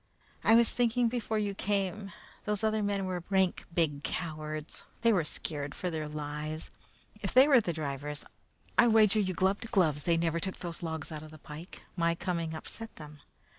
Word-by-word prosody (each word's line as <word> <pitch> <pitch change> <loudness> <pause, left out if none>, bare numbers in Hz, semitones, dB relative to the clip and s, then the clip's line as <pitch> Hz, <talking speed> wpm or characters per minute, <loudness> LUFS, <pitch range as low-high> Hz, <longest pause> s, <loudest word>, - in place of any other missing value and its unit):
"I 225 - +7
was 235 0 +6
thinking 240 0 +2
before 225 -2 -1
you 205 -1 0
came. 195 0 -1 0.3
Those 210 0 -1
other 220 0 +2
men 200 -1 0
were 180 -2 -3
rank 190 -2 +2
big 155 -4 +1
cowards. 155 -2 -4 0.2
They 230 -1 +5
were 180 -5 +3
scared 145 -2 -3
for 180 - -3
their 155 -2 -3
lives. 150 +1 -4 0.5
If 200 - -3
they 260 +2 +9
were 270 -5 +7
the 180 - -1
drivers, 150 -2 -4 0.5
I 240 - +8
wager 220 -2 +5
you 185 -3 0
gloves 190 +3 +2
against 230 - -9
gloves 155 -8 +3
they 170 -1 +3
never 165 0 +1
took 190 +1 -3
those 170 -2 -5
logs 160 -1 -4
out 155 - -4
to 155 - -10
the 155 0 -12
pike. 155 +4 -10
My 170 -1 +2
coming 170 -2 -2
upset 225 +8 -7
them. 150 -1 -11
175 Hz, 190 wpm, -31 LUFS, 155-210 Hz, 0.5 s, they